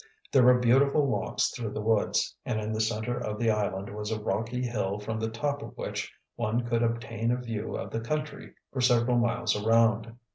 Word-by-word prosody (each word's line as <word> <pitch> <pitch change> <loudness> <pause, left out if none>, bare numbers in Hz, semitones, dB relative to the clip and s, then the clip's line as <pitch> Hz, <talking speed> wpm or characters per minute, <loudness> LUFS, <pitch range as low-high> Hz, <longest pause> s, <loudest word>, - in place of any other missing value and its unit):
There 135 - +6
were 125 0 +7
beautiful 135 +4 +4
walks 135 - 0
through 115 -4 -5
the - - -3
woods, 110 0 +1
and 110 - -1
in 110 0 -3
the 110 0 0
center 110 +2 -1
of 105 -3 -3
the 115 0 +2
island 100 -2 -2
was 105 0 -4
a 110 -1 -2
rocky 115 +5 -2
hill 105 -5 -1
from 110 +2 -4
the 110 0 -1
top 145 +5 -2
of - - -9
which - - -4 0.2
one 120 +1 -1
could 120 -1 0
obtain 115 -1 -1
a 125 - +2
view 115 -4 -4
of - - -6
the 115 - -2
country 150 +5 -4 0.2
for 130 - -1
several 120 -1 +4
miles 120 -1 +1
around. 115 +1 +3
115 Hz, 205 wpm, -28 LUFS, 110-125 Hz, 0.2 s, were